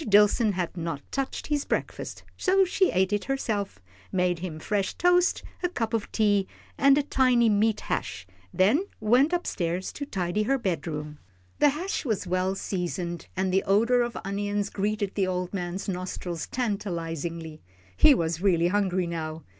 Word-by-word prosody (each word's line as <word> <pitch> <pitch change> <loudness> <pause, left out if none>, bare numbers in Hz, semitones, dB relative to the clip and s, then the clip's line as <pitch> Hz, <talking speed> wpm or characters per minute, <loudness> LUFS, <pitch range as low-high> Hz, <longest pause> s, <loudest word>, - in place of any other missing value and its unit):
Dillson 210 +1 +5
had 180 -2 -3
not 165 -4 -4
touched 275 -1 -3
his 295 -2 0
breakfast, - - -3
so 385 +1 +3
she 375 +1 +2
ate 190 +2 +1
it 205 - 0
herself, 215 - -2 0.3
made 180 -2 +1
him 170 -3 -5
fresh 195 +4 -1
toast, 355 0 +3 0.2
a 360 - +1
cup 230 -9 -3
of 225 -2 -1
tea, 205 -3 +2 0.3
and 275 0 +5
a 295 - +2
tiny 255 -4 +3
meat 210 +1 +2
hash, 100 - -3 0.3
then 220 - +3
went 245 +8 +4
up 350 0 0
stairs 175 +1 -2
to 285 - -5
tidy 185 -3 -1
her 270 +6 +2
bedroom. 150 - -3 0.4
The 295 - +6
hash 340 +8 -3
was 215 -8 -1
well 185 +1 0
seasoned, 175 -2 -3
and 190 0 0
the 190 - +4
odour 230 +5 +3
of 240 -1 -2
onions 205 +1 -2
greeted 205 0 -1
the 195 -2 +1
old 180 0 -2
man's 180 +1 -3
nostrils 180 -3 -4
tantalisingly. 170 - -3 0.3
He 285 - +7
was 165 -3 -1
really 175 -3 +3
hungry 190 -2 +1
now. 160 -2 -4
200 Hz, 160 wpm, -27 LUFS, 175-235 Hz, 0.4 s, He